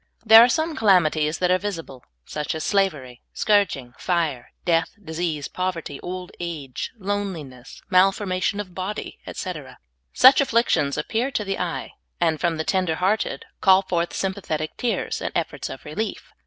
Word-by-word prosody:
' - - -49
' - - -32
There 225 +1 +10
are 245 - +4
some 315 +4 0
calami 185 -8 +4
ties 155 0 -1
that 180 0 +1
are 185 - +3
visible, 165 -11 -6 0.2
such 150 +1 -3
as 160 - -3
slavery, 150 - 0
scourging, 195 - +1
fire, 165 -8 -1
death, 165 -1 +1
disease, 160 -5 -3
povert}^, 175 -6 -4
old 180 0 -6
age, 155 -7 -5
loneliness, 185 - -5
malforma 185 0 +3
tion 200 - 0
of 190 -3 -6
bod}', 190 +3 -3 0.3
etc. 150 -9 -6 0.3
Such 260 +2 +7
afflictions 230 - +2
appear 235 +4 -1
to 220 -6 -2
the 195 0 -2
eye, 175 -2 -3 0.3
and 160 -3 +1
from 170 -2 +1
the 160 - -1
tender 185 -2 0
hearted 190 +5 0 0.2
call 190 -1 +6
forth 175 -2 -1
sj'mpathetic 185 -5 -2
tears 240 -2 -2
and - - -2
efforts - - -2
of - - -9
relief. - - -4
180 Hz, 165 wpm, -23 LUFS, 155-200 Hz, 0.3 s, There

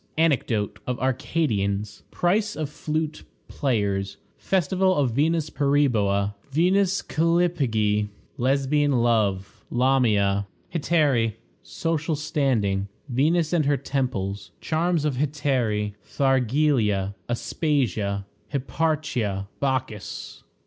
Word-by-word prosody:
Anecdote 130 -10 +1
of 125 -1 -2
Arcadians. 110 -7 -1
Price 205 +4 +1
of 155 -2 -3
Flute 155 0 -3 0.2
players. 100 -7 -1 0.2
Festival 185 +1 +1
of 135 -4 +2
Venus 155 +4 +1
Periboa. 115 -9 +2 0.2
Venus 185 +6 +2
Callipyge. 140 -12 +1 0.3
Lesbian 140 +3 +2
Love. 110 -6 +1
Lamia. 110 -6 +2 0.3
Hetairæ. 145 - +2 0.3
Social 160 - -2
Standing. 115 -10 0 0.2
Venus 155 +6 +2
and 160 -4 +2
her 145 -1 +3
Temples. 105 -8 -2
Charms 165 -1 0
of 145 -4 0
Hetairæ. 130 -8 0
Thargelia. 125 -7 +1 0.2
Aspasia. 115 - -1 0.3
Hipparchia. 135 -9 -1
Bacchis. 130 -6 -3
135 Hz, 85 wpm, -25 LUFS, 105-155 Hz, 0.3 s, her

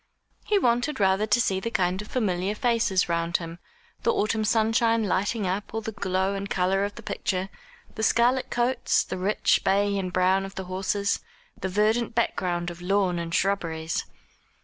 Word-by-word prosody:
He 420 - +2
wanted 245 - +1
rather 195 +2 +2
to 210 +2 +3
see 190 -5 +1
the 230 - -3
kind 190 0 -1
familiar 195 -4 -1
faces 225 -5 +1
round 170 0 0
him, 165 0 -8 0.4
the - - +2
autumn 220 +1 0
sunshine 225 +1 +2
lighting 205 +2 0
up 195 +4 -3
all 225 - -1
the 220 - -5
glow 190 -1 -1
and 200 0 -4
colour 190 +2 +1
of 205 0 -3
the 235 - -10
picture, 190 -2 -2 0.4
the - - -5
scarlet 240 +3 +2
coats, 240 +2 +1
the - - -5
rich 200 +3 +2
bay 200 +1 +2
and 185 -1 -3
brown 185 +1 +2
of 195 0 -8
the 190 - -4
horses, 195 +2 -1 0.4
the 190 -3 -4
verdant 220 +4 +1
background 175 -6 0
of 170 0 -11
lawn 185 -1 +1
and 170 0 -3
shrubberies. 165 -5 -1
195 Hz, 170 wpm, -26 LUFS, 185-220 Hz, 0.4 s, to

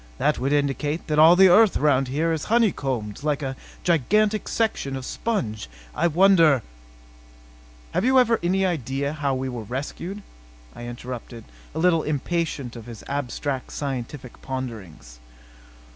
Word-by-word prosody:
That - - +1
would 135 +2 -1
indicate 145 +2 0
that 150 -1 0
all 160 +3 +8
the 190 +1 +7
earth 210 +3 +5
around 135 -3 +2
here 160 +5 0
is 160 - -3
honeycombed 135 - 0
like 150 -1 -1
a 135 0 -3 0.3
gigantic 205 - +2
section 220 -12 -1
of 130 -1 -6
sponge. 115 - -3 0.2
I 170 - +1
wonder 165 - +5 0.7
" - - -25
"Have - - +1
you 260 +2 +4
any 195 -6 +3
idea 140 -4 -2
how 145 -3 -1
we 130 0 -3
were 125 -3 -5
rescued?" 145 - -6 0.5
I 120 - -8
interrupted, 120 -1 -8 0.3
a - - -4
little 165 -1 +3
impatient 150 -3 -2
of 115 -1 -10
his 115 -3 -10
abstract 140 -1 -4
scientific 130 -2 -5
ponderings. 105 - -7
140 Hz, 145 wpm, -24 LUFS, 125-170 Hz, 0.7 s, all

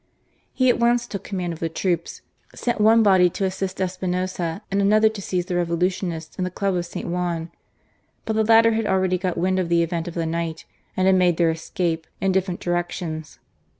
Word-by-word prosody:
He 255 - +1
at - - -2
once 240 0 +3
took 200 -4 -6
command 180 -4 -3
of 160 - -10
the 165 - -2
troops; 170 0 -2 0.3
sent 240 -3 -1
one 225 +1 +6
body 190 -3 +5
to 195 +3 -2
assist 190 0 -3
Espinoza, 185 -1 -2
and 200 +1 +1
another 215 +2 +4
to 215 -2 -7
seize 180 -2 -2
the 180 - -3
Revolutionists 175 -1 -2
in - - +1
the 185 - -1
Club 195 +1 -1
of 175 -1 -2
St. - - -6
Juan. 170 -1 -2 0.7
But 220 - -1
the 220 - +3
latter 225 +1 +6
had 220 -1 0
already 185 -1 +1
got 180 -1 -2
wind 185 +2 +1
of 180 -2 -1
the 170 0 +3
event 170 0 -3
of 170 - -6
the 165 -1 -1
night, 165 0 -3 0.3
and 185 - +2
had 190 0 +5
made 175 -2 +3
their 170 -2 +3
escape 165 0 -3
in 195 - +1
different 185 -1 -1
directions. 175 -2 -3
180 Hz, 205 wpm, -23 LUFS, 170-195 Hz, 0.7 s, one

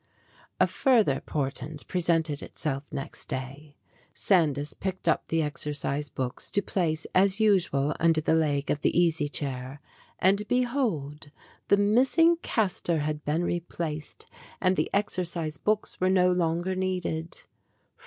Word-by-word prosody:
A - - +6
further 220 - +2
portent 145 +1 -4
presented 165 -4 0
itself 140 -2 -4
next 140 -3 -6
day. 140 +2 -6 0.4
Sandys 150 -6 +1
picked 190 -2 -5
up 160 - +2
the 165 0 +1
exercise 145 -1 -3
books 130 -1 -4
to 200 - +1
place, 160 -4 -1
as 190 +2 +3
usual, 175 -9 +2
under 165 -1 +4
the 155 - +1
leg 145 -3 +1
of 145 - -1
the - - +2
easy 160 -4 +2
chair, 135 -1 -3 0.4
and, 200 +3 +2
behold, 225 - -1 0.4
the 200 - +5
missing 260 +11 +4
cas 220 - -1
tor 170 -2 0
had 150 0 -2
been 155 +4 0
replaced 165 -3 -4 0.3
and 185 0 +2
the - - 0
exercise 175 -6 -1
books 215 -2 -1
were 185 - +3
no 180 -1 +4
longer 175 +1 0
needed. 180 -3 -3
165 Hz, 135 wpm, -27 LUFS, 150-190 Hz, 0.4 s, A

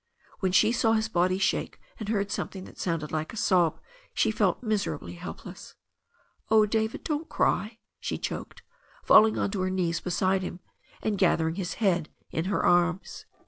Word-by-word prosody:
When 190 -2 0
she 215 +4 +5
saw 230 -1 +2
his 220 0 +1
body 185 -2 +2
shake 195 - -1 0.2
and 215 -2 -5
heard 200 -2 0
something 190 -2 -4
that - - -13
sounded 165 -4 -2
like 155 +4 -3
a - - -8
sob 175 -6 +2 0.4
she - - +2
felt - - +1
miserably 205 - -2
help 85 - -8
less. - - -10 0.7
"Oh, 220 -1 +6
David, 220 +1 -1
don't 310 0 -3
cry," 215 +3 0 0.2
she - - -3
choked, - - -6 0.4
falling 220 0 +6
on 200 - 0
to 195 -2 -2
her 185 - 0
knees 175 -3 0
beside 185 +1 0
him, 180 -1 -5 0.4
and 210 -3 -1
gathering 160 -3 +2
his 180 -1 -4
head 180 -8 +1 0.2
into 165 +4 -2
her 200 - 0
arms. 175 +1 +1
190 Hz, 175 wpm, -27 LUFS, 175-215 Hz, 0.7 s, Oh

